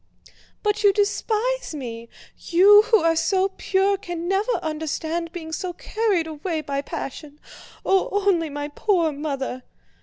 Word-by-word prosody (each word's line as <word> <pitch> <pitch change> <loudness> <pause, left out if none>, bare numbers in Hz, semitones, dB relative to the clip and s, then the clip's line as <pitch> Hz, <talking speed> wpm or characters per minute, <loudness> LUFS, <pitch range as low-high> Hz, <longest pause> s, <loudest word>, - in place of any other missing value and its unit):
"But 420 0 +1
you 405 - +7
despise 435 +1 0
me. 235 -4 -7 0.3
You 400 +4 +6
who 445 -7 +4
are 330 0 +3
so 380 +3 +2
pure 390 +1 +1
can 345 -2 -5
never 395 +6 +1
understand 320 +2 -3
being 320 -2 -7
so 355 +2 -3
carried 410 -3 0
away 320 +1 -3
by 280 -2 -3
passion. 290 +1 -7 0.5
Oh, 385 -1 +2 0.2
only 335 -5 +2
my 290 0 -5
poor 335 0 +1
mother..." 275 -3 -4
335 Hz, 140 wpm, -23 LUFS, 305-395 Hz, 0.5 s, you